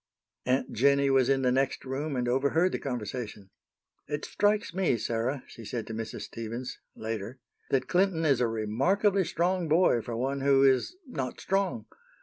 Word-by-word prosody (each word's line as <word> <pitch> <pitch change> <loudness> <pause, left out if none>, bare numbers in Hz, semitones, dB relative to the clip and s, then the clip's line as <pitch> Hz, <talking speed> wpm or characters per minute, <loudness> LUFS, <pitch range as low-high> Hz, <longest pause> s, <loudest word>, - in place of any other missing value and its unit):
Aunt 130 +2 +1
Jennie 140 +3 +3
was 135 -1 +4
in 135 -1 +2
the 125 - +3
next 135 +1 0
room 140 +3 -3
and 125 -1 -1
overheard 140 +8 +2
the - - -2
conversation. 110 -5 -5 0.6
"It 150 0 -3
strikes 205 -3 +1
me, 185 -9 +1
Sarah," 120 +4 -2
she 115 - -12
said 115 +1 -4
to 110 - -7
Mrs. 115 0 -5
Stevens, 115 +3 -6 0.2
later, 110 +2 -5 0.3
"that 130 -1 +1
Clinton 180 -3 +2
is 135 -5 +3
a 120 - +3
remarkably 155 - +1
strong 175 +1 0
boy 160 -7 +4
for 115 0 -5
one 135 +3 -1
who 135 0 +4
is 135 - +3
not 130 - -4
strong. 190 - -1
135 Hz, 165 wpm, -29 LUFS, 120-160 Hz, 0.6 s, was